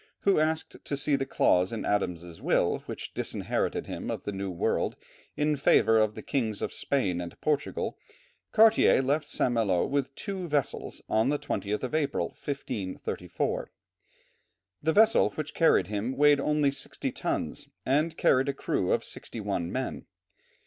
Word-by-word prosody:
who 195 -5 +3
asked 160 +1 0
to 140 - -2
see 140 +1 +2
the 135 0 -2
clause 90 -8 +3
in 115 - -4
Adam's 90 -4 -2
will - - +2
which - - -6
disinherited - - -2
him - - -5
of - - -3
the - - -3
New 100 0 -4
World 85 -2 0 0.4
in 150 0 +2
favour 115 -5 +4
of 110 -1 +2
the - - -8
kings 115 -7 -1
of - - -3
Spain 95 -11 0
and 85 -1 -8
Portugal, 150 -1 -1 0.5
Cartier 220 -10 +5
left 145 +3 0
St. 125 - +1
Malo 100 -7 +2
with 140 -1 -1
two 190 -4 -4
vessels 145 -4 -2
on 110 +4 +2
the 145 - +1
20th 105 -3 -3
of 130 - -3
April, 145 -3 0
1534. 125 -9 -4 1.1
The 160 - +2
vessel 220 +5 +5
which 155 -1 -4
carried 165 - +4
him 110 +6 -3
weighed 145 0 +5
only 150 0 +2
sixty 140 - -3
tons - - -3 0.2
and 155 +5 +1
carried 130 +1 +3
a - - 0
crew - - -1
of - - 0
sixty 115 - -6
one 100 -5 -2
men. - - -4
135 Hz, 160 wpm, -28 LUFS, 105-150 Hz, 1.1 s, Cartier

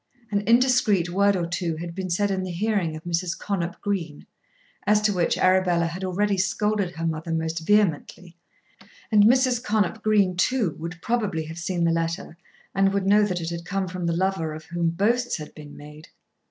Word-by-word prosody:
An 200 -1 +1
indiscreet 235 -7 +3
word 200 +2 +3
or 175 -2 -1
two 170 -1 -2
had 170 +1 -6
been 185 +1 -4
said 200 +4 +1
in 190 -1 -1
the 185 - -4
hearing 180 -3 -1
of 155 - -9
Mrs. 170 0 -2
Connop 175 -4 -3
Green, 175 -8 -3 0.6
as 210 0 +5
to 210 -1 +2
which 175 -2 +1
Arabella 185 -2 +3
had 170 +3 -5
already 195 +2 0
scolded 200 -1 0
her 165 +1 -4
mother 160 0 -3
most 160 0 -1
vehemently, 180 -2 0 0.8
and 205 -1 +6
Mrs. 250 0 +3
Connop 215 -2 0
Green 205 -4 +2
too 215 +1 +1
would 165 +1 -6
probably 210 -9 -1
have 160 +2 -8
seen 175 0 -2
the 165 - +3
letter, 165 +1 -2 0.4
and 195 0 +3
would 200 -1 0
know 205 +2 +5
that 180 -4 -1
it 165 +1 -4
had 170 0 -5
come 195 +1 -2
from 180 -1 -4
the 170 0 0
lover 185 -4 -1
of 155 0 -10
whom 170 0 -1
boasts 235 +8 0
had 150 -2 -9
been 150 -1 -12
made. 150 +1 -12
185 Hz, 195 wpm, -24 LUFS, 165-205 Hz, 0.8 s, and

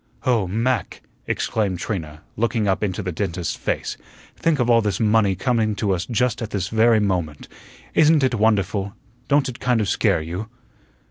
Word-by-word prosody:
"Oh, 115 -7 +2
Mac!" 115 +6 -1 0.2
exclaimed 100 -5 -1
Trina, 80 -5 -5
looking 115 -1 0
up 95 +2 +1
into 100 0 -2
the 90 - -3
dentist's 85 -2 -3
face, - - -3 0.4
"think 165 -2 +1
of 125 -3 +1
all 115 -1 +5
this 105 -2 -1
money 105 -3 +3
coming 110 0 0
to 100 -1 -1
us 90 +2 -1
just 120 0 0
at 110 - -3
this 100 -3 -2
very 110 0 +4
moment. 90 -7 -2 0.5
Isn't 155 -2 +4
it 130 -1 +2
wonderful? 100 -3 +1 0.3
Don't 140 -1 +3
it 125 -2 -7
kind 125 -2 +1
of 105 - 0
scare 80 - +1
you?" 90 +7 -5
105 Hz, 175 wpm, -22 LUFS, 95-115 Hz, 0.5 s, all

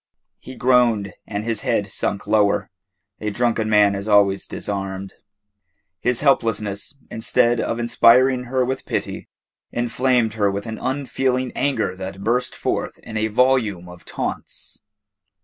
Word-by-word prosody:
He 130 - -10
groaned 120 -6 +2
and 105 0 -3
his 115 -1 -2
head - - -1
sunk 100 - -2
lower. 105 -1 +2 0.5
A 105 - -2
drunken 115 0 0
man 105 -1 +5
is 100 +1 -4
always 100 -2 +3
disarmed. 95 -1 -5 0.9
His 125 -1 0
helplessness, 110 -4 0
instead 115 +1 +2
of 115 - -2
inspiring 125 +2 +4
her 130 +1 0
with 130 +1 -4
pity, - - -3 0.4
inflamed 120 -1 +1
her 105 -2 +1
with 100 +2 -4
an 110 -1 -6
unfeeling 130 -1 -1
anger 115 -9 0
that 95 +1 -7
burst 120 +4 0
forth - - -2
in 110 - -8
a 110 0 +1
volume 110 -6 +1
of 90 -1 -12
taunts. - - -6
110 Hz, 135 wpm, -21 LUFS, 100-125 Hz, 0.9 s, man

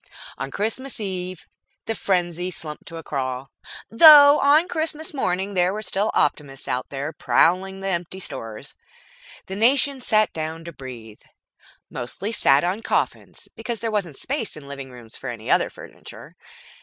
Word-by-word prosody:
On 135 - -3
Christmas 225 - -3
Eve 185 -3 -5 0.4
the 225 - -1
frenzy 180 -3 -1
slumped 155 -4 -7
to 165 - -8
a 165 - -8
crawl, 130 -2 -4 0.4
though 290 +3 +9
on 300 +5 +4
Christmas 315 -2 -2
morning 195 -6 -1
there 180 -1 +2
were 215 +2 -5
still 210 +1 0
optimists 135 -3 0
out 125 0 -3 0.3
prowling 190 +3 +2
the 195 - -4
empty 175 +1 -3
stores. 115 - -7 0.7
The 190 - -6
nation 265 +5 +3
sat 215 -3 +2
down 160 +1 -5
to 170 - -8
breathe. 120 -6 -10 0.7
Mostly 180 - -4
it - - +1
sat 135 -7 +4
on 185 +5 -1
coffins, - - -2
because 235 -3 -5
there 225 +1 -3
wasn't 180 -9 -2
space 245 - -3
in 150 - -10
the 140 - -13
living 140 -1 -7
rooms 120 -3 -11
for 130 - -6
any 115 -2 -5
other - - +3
furniture. - - -13
185 Hz, 160 wpm, -23 LUFS, 140-225 Hz, 0.7 s, though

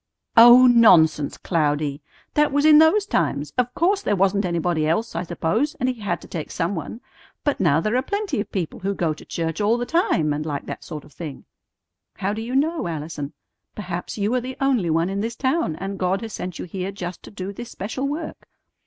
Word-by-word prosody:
"Oh, 240 +2 +9
nonsense, 180 - +5
Cloudy! 150 -3 -1 0.3
That 300 0 +3
was 290 +2 +2
in 305 -1 +8
those 375 +6 +5
times. 150 - -1
Of 250 -1 0
course. 385 +4 +2
There 205 - 0
wasn't 195 +1 +2
anybody 170 -2 0
else, 215 +7 -1
I 165 - -1
suppose; 180 - -1
and 255 - -1
He 250 -3 -3
had 205 - -2
to - - -12
take 160 -4 -5
some 175 +3 -2
one. 180 +7 -6 0.4
But 290 - 0
now 160 -5 +3
there 215 +7 -1
are 255 - +3
plenty 405 - -2
of - - -8
people 180 -6 -3
who 195 +1 -2
go 165 -4 0
to 155 - -13
church 165 +2 -3
all 215 +3 +3
the 245 - -2
time 320 - +1
and 150 +1 -3
like 145 -3 -4
that - - -7
sort 150 -2 -8
of 150 - -18
thing." 155 -5 -8 0.7
"How 200 +1 -2
do 220 - -4
you 240 +3 -4
know, 315 - +1
Allison? 155 -2 -5 0.4
Perhaps 180 -2 -5
you 210 +3 0
are 255 - +1
the 255 +2 -7
only 255 -10 +1
one 165 +2 +2
in 195 +1 -2
this 230 +2 -3
town, 260 - 0
and 195 +3 -5
God 185 +2 0
has 225 -2 -7
sent 180 -2 -5
you - - -5
here 185 +2 -4
just 180 -2 -6
to - - -12
do 200 -1 -6
this 240 +4 -8
special 235 +8 -4
work." 305 +3 -6
195 Hz, 220 wpm, -23 LUFS, 165-250 Hz, 0.7 s, Oh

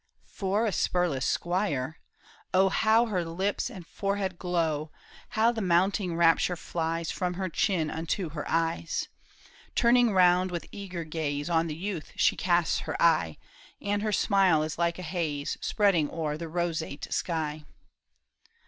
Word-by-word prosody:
For 200 +3 -1
a 220 - +1
spurless 175 -9 0
squire! 170 -6 -1 0.6
oh 190 +1 +5
How 220 +4 +3
her 190 -6 -1
lips 190 +8 -2
and 190 -9 -10
forehead 195 -1 -2
glow! 160 -4 -1 0.5
How 225 +2 +5
the 230 -2 -4
mounting 185 0 +2
rapture 170 +1 +4
flies 165 0 -3
From 180 -1 -2
her 190 0 -2
chin 165 -2 0
unto 165 +2 -2
her 150 -1 -4
eyes! 165 0 -1 0.7
Turning 240 -1 +4
round 180 -1 +4
with 175 -2 -4
eager 185 -4 -6
gaze, 155 -1 -3
On 165 0 +2
the 155 - -4
youth 175 -2 -5
she - - +3
casts 175 -2 +2
her - - -5
eye, 155 - +3 0.4
And 205 0 -1
her 215 0 -1
smile 190 -6 +3
is 155 +1 -5
like 170 0 +1
a 185 - -7
haze 155 -5 -2
Spreading 185 -8 +2
o'er 155 -3 -2
a 165 +2 -5
roseate 160 -3 -3
sky. 155 -3 -2
175 Hz, 150 wpm, -28 LUFS, 160-195 Hz, 0.7 s, oh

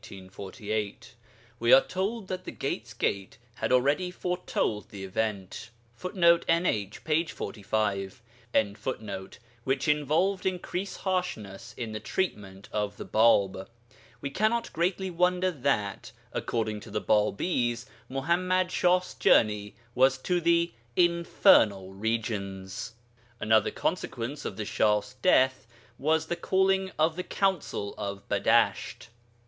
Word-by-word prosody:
We 120 +1 +2
are 135 - +10
told 195 +6 -3
that 185 -1 -5
the - - -5
'Gate's 115 -4 -4
Gate' 100 -1 -2 0.2
had - - -3
already 140 +8 +3
foretold 180 - -2
this 100 -2 -8
event, 100 +1 -3 0.3
[Footnote: 170 - +3
NH, 110 - 0
p. 160 +1 +2
45.] 100 - -3 1.4
which 135 +1 0
involved 155 +6 +1
increased 185 +1 -3
harshness 180 - -3
in 115 -3 -4
the 110 - -4
treatment 100 - -3
of 105 -1 -2
the - - -7
Bāb. 100 -4 +3 0.5
We 140 - -4
cannot 220 +7 0
greatly 185 +3 0
wonder 180 +1 +2
that, 130 - -1 0.2
according 110 -2 -2
to 110 - -12
the 105 - -2
Bābīs, 120 - +1 0.2
Muḥammad 180 +7 +1
Shah's 180 0 +2
journey 105 -2 +3 0.2
was 130 +2 +4
to 180 -1 +1
the 170 0 +3 0.2
infernal 115 - +4
regions. 100 -2 -3 0.4
Another 110 0 +3
consequence 130 +6 -3
of 95 - -4
the 105 - -3
Shah's 105 +3 +1
death 130 -9 +3 0.3
was 160 +3 +2
the 175 - -2
calling 190 +1 +1
of 160 +1 +2
the 180 - -3
Council 185 - -1
of 100 0 -5
Badasht. 105 0 +1
130 Hz, 115 wpm, -28 LUFS, -, 1.4 s, are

